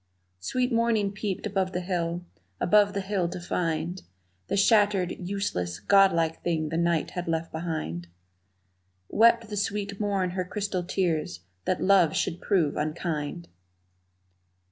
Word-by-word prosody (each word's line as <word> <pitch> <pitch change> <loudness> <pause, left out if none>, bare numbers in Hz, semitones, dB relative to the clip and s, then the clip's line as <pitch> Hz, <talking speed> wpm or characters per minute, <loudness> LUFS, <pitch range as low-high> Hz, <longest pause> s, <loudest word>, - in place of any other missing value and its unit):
Sweet 250 - -1
morning 230 -3 +2
peeped 205 -1 -4
above 190 -2 -1
the 180 - -1
hill, 175 -1 -2 0.3
above 205 +1 +4
the 200 - -1
hill 190 -3 -1
to 180 +1 -6
find 170 0 -2 0.5
The - - -1
shattered, 205 -3 +3
useless, 175 - -3
godlike 170 -5 +3
thing 160 -3 -1
the 165 - -2
night 170 -2 +1
had 180 -1 -4
left 165 0 -1
behind 155 - -4 1.0
Wept 230 +1 +4
the 210 - -4
sweet 200 0 -2
morn 200 -3 0
her 185 0 -2
crystal 195 -1 -3
tears 170 - -1 0.2
that 185 - 0
love 185 -5 +4
should 170 - -1
prove 170 -8 +1
unkind! 155 +1 -3
180 Hz, 135 wpm, -27 LUFS, 165-200 Hz, 1.0 s, above